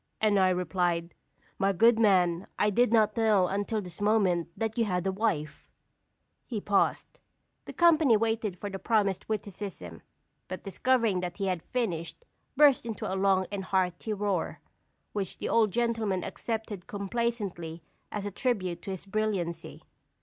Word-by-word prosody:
And 210 -2 +3
I 185 -1 +4
replied: 175 -1 0 0.5
'My 195 0 +2
good 230 +4 +5
man, 185 -4 +3
I 210 - +2
did 240 +3 +3
not 215 -2 +3
know 215 -5 +3
until 205 +3 -2
this 180 +1 -10
moment 200 -6 +2
that 225 -1 -2
you 235 -2 +2
had 180 -3 -1
a 190 - +1
wife!'" 185 -7 -2 0.8
He 230 -5 -3
paused; 200 0 0 0.5
the - - -8
company 315 -9 +5
waited 225 -3 -1
for 205 - -5
the 195 -1 -5
promised 205 -4 0
witticism, 195 - -5 0.5
but 185 - -6
discovering 225 -1 +1
that 180 -1 -4
he 200 - -2
had 185 -3 -1
finished, 205 - -3 0.3
burst 280 -5 +5
into 220 -3 -4
a - - -2
long 190 -1 +2
and 195 -2 -4
hearty 185 +2 -1
roar, 200 -4 -1 0.5
which 200 -3 -3
the - - -4
old 225 -2 +4
gentleman 225 -4 0
accepted 220 -5 -5
complacently 200 -6 -3 0.3
as 210 -1 -4
a 205 - -3
tribute 185 -7 -1
to - - -8
his 190 -1 -5
brilliancy. 195 -5 -3
200 Hz, 155 wpm, -29 LUFS, 180-220 Hz, 0.8 s, good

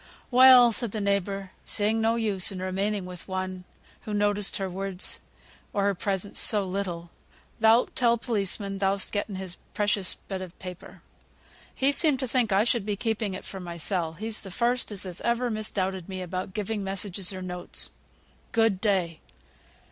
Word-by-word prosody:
"Well!" 250 -1 +8
said 230 -1 -2
the 215 - -2
neighbour, 200 -1 -1
seeing 215 +1 +2
no 225 +1 +2
use 210 -6 +2
in 190 - -6
remaining 195 +2 -1
with 180 -1 -9
one 185 -1 -4 0.4
who 210 - -4
noticed 205 -1 +3
her 195 - -2
words 190 0 -1 0.5
or 200 - +1
her 200 0 +3
presence 195 +1 -2
so 205 -3 +4
little; 180 -3 -4 0.5
"thou'lt 225 +2 +4
tell 235 -1 +4
policeman 200 -3 -1
thou'st 195 0 +1
getten 205 -1 -2
his 185 -1 -6 0.2
precious 205 -2 0
bit 190 -2 -6
of 185 -1 -9
paper. 180 -2 -10 0.7
He 270 +1 +3
seemed 285 -2 +4
to 260 - -1
think 240 -3 +1
I 195 +2 +4
should 235 -2 +1
be 205 0 -2
keeping 215 -2 -2
it - - -8
for 195 - -7
mysel; 170 -1 -2
he's 215 +5 -2
th' 195 - -9
first 240 +3 0
as 205 -1 -4
has 180 -2 -7
ever 235 +1 0
misdoubted 190 -4 -2
me 185 -1 -4
about 185 +1 -5
giving 210 0 -2
messages, 195 -1 -2
or 185 -1 -6
notes. 180 -1 -4 0.6
Good 225 -4 +2
day." 185 -6 +1
200 Hz, 170 wpm, -27 LUFS, 185-220 Hz, 0.7 s, Well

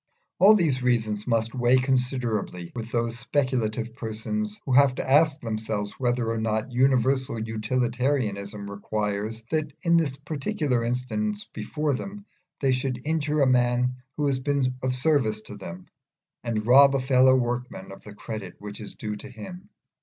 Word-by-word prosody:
All 205 +3 +8
these 155 -10 +2
reasons 110 -4 0
must 115 -1 +1
weigh 125 +1 +4
considerably 125 -9 -1
with 115 -1 -6
those 115 0 -1
speculative 120 -4 -1
persons 205 - -4
who 135 - -3
have 135 0 +5
to - - -4
ask 150 +2 +4
themselves 110 -2 -3
whether 120 -2 0
or 115 0 -1
not 110 +3 -1
Universal 130 -1 +2
Utilitarianism 110 -2 -1
requires 105 +2 -3
that 155 -1 0
in 170 -1 +4
the 145 -5 0
particular 145 - -1
instance 205 - -2
before 150 -2 -2
them 200 +9 -6 0.4
they 135 -2 +3
should 130 0 -2
injure 150 -1 0
a - - +5
man 125 0 +2 0.2
who 150 - 0
has 135 -2 +1
been 135 -1 0
of 130 0 0
service 125 -6 +1
to 105 - -9
them, 90 -2 -9 0.6
and 110 -3 -2
rob 135 +3 +7
a - - +2
fellow 130 0 +5
workman 120 -6 -2
of 95 - -11
the 105 -1 -12
credit 105 -4 -7
which 105 +1 -8
is 105 - -9
due 105 -1 -4
to 135 - -10
him. 180 - -10
125 Hz, 160 wpm, -26 LUFS, 110-140 Hz, 0.6 s, All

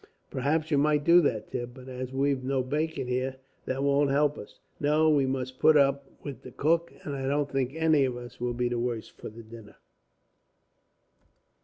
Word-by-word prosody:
"Perhaps 155 +4 0
you 145 - +4
might 150 0 +2
do 170 +3 +7
that, 110 -8 -1
Tim, 120 -1 -4
but 130 0 -12
as 130 0 -6
we've 135 0 0
no 130 0 0
bacon 150 0 -2
here, 130 +1 -1 0.3
that 130 +1 -2
won't 140 0 +3
help 145 +1 +2
us. - - -11 0.2
No, 155 +2 +3
we 140 -3 +3
must 130 -1 -3
put 155 -1 +6
up 140 -1 +2
with 140 -3 -7
the - - -10
cook, 165 +5 +1
and 145 - -4
I 135 -1 -3
don't 145 0 0
think 135 +1 -1
any 160 -3 +3
of 125 -2 -3
us 120 0 -10
will 120 0 -2
be 125 0 0
the 120 0 -2
worse 120 -2 -3
for - - -10
the 115 +2 -12
dinner." 110 -1 -13
135 Hz, 195 wpm, -28 LUFS, 125-145 Hz, 0.3 s, do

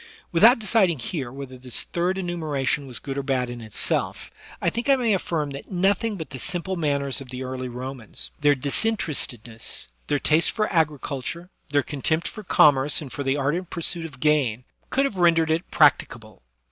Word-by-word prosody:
Without 225 +9 +7
deciding 215 -7 +2
here 130 0 -4
whether 135 -1 -8
this 125 -1 -2
third 180 +2 -1
enumeration 155 -6 -2
was 125 - -4
good 140 -1 -4
or - - 0
bad 130 -2 -1
in 120 -1 -7
itself, 110 -3 -2 0.3
I - - +1
think 235 +4 -3
I 275 - +7
may 240 -5 +1
afiSrm 155 -6 -1
that 140 - -9
nothing 195 +4 +1
but 160 -7 -7
the 130 - -7
simple 180 +6 -1
manners 140 -4 0
of 130 - -10
the 130 +1 -5
early 130 0 -4
Romans 125 -2 -5
— - - -36
their 145 -1 +5
disinterestedness, 140 - 0 0.2
their 145 - +1
taste 155 +3 +3
for 215 -1 0
agriculture, 160 +2 -1 0.2
their 145 -1 +2
contempt 160 +3 -1
for 215 - -7
commerce 145 -5 +4
and 145 -5 -8
for - - -4
the 135 0 0
ardent 155 +6 -1
pursuit 170 0 -1
of 130 -5 -15
gain 135 -6 +2
— - - -40
could 275 +1 +2
have 215 -8 -3
rendered 165 -2 +4
it 165 +3 -1
practicable. 115 - +2
145 Hz, 185 wpm, -24 LUFS, 130-175 Hz, 0.3 s, Without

